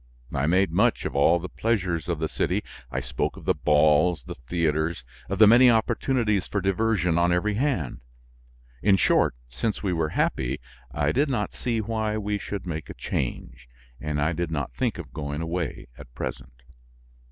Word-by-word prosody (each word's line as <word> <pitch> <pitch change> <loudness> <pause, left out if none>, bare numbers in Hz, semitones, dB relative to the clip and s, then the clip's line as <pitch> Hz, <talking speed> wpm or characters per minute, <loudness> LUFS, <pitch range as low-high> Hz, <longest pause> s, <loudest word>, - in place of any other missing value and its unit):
I 70 +3 0
made 95 +2 +3
much 110 +7 +2
of - - -3
all 70 +5 +5
the 85 +1 -5
pleasures 90 -8 -1
of 85 - 0
the 80 +1 -1
city; - - -1 0.3
I 65 +1 -2
spoke - - -3
of - - -11
the - - +3
balls, 75 +3 +3
the - - -7
theaters, 80 +3 -1 0.3
of 100 - -1
the 110 - +8
many 120 +4 +7
opportunities 115 -2 +1
for 100 - -1
diversion 95 -3 +1
on 85 0 +3
every 90 +5 +1
hand. 110 - -1 0.8
In 100 -2 +4
short, - - +3
since 105 - -3
we 95 -3 0
were 80 -2 0
happy, 65 -2 0 0.3
I - - 0
did 140 +3 +1
not 115 -6 -1
see 115 -3 -1
why 110 0 -1
we 105 -1 -2
should 100 -1 -5
make 80 -3 -5
a - - -7
change; 60 -1 -4 0.3
and 75 0 -2
I 80 +4 +1
did 85 +1 -2
not 75 -6 -3
think - - -1
of - - -9
going 75 -1 -4
away 85 0 -3
at 70 -4 -13
present. 60 -1 -6
85 Hz, 180 wpm, -25 LUFS, 75-105 Hz, 0.8 s, the